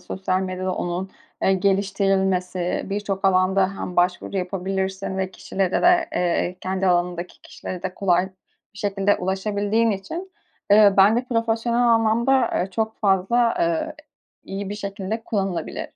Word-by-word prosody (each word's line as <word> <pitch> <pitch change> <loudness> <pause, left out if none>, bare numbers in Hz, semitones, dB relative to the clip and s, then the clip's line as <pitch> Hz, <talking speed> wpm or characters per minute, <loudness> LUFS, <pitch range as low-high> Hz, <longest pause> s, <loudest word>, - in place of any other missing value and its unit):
sosyal 185 -1 -2
medyada 185 0 -3
onun, 180 +2 -3 0.3
eee, 195 - +4
geliştirilmesi, 190 -2 0
birçok 200 -1 -3
alanda 190 +1 +2
hem 180 - -5
başvuru 180 +2 +1
yapabilirsin 190 +1 -3
ve 190 -1 -1
kişilere 190 0 -2
de 350 0 +4
eee, 180 +1 0
kendi 190 +1 -1
alanındaki 175 0 -1
kişilere 180 -1 -8
de 185 -1 -4
kolay 180 -2 +2 0.5
bir 200 - -13
şekilde 200 0 +1
ulaşabildiğin 205 +4 0
için, 330 - -5 0.4
ııı, 205 -1 +7
ben 200 +3 +6
de 245 - 0
profesyonel 230 0 0
anlamda, 235 +3 +3
ııı, 185 +2 -1
çok 220 +2 -2
fazla, 210 +4 +2
ııı, 170 - 0 0.5
iyi 195 0 -5
bir - - -3
şekilde 205 +1 -4
kullanılabilir. 195 -4 -3
195 Hz, 135 wpm, -23 LUFS, 185-210 Hz, 0.5 s, ııı